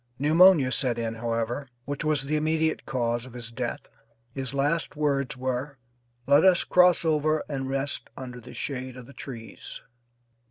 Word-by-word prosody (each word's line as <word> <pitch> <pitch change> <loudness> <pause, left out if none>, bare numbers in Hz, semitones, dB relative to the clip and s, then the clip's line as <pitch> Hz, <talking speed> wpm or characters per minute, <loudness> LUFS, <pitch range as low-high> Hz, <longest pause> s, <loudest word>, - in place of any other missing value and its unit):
Pneumonia 155 -1 +6
set 125 -1 0
in, 115 -1 -2
however, 115 +4 -2 0.2
which 145 +2 -3
was 150 -2 +1
the 145 +3 -1
immediate 160 +1 0
cause 120 -2 -1
of 125 - -13
his 120 -2 -7
death. 115 - -4 0.5
His 135 -2 -4
last 145 +4 0
words 140 -4 0
were, 130 +2 -3 0.5
"Let 145 +2 +5
us 185 -2 +5
cross 180 -1 +4
over 155 0 +2
and 135 -2 -3
rest 135 +1 -2
under 125 -2 -7
the 125 - -12
shade 130 -2 -5
of 125 - -9
the 140 - -14
trees." 115 -6 -8
135 Hz, 160 wpm, -27 LUFS, 125-150 Hz, 0.5 s, Pneumonia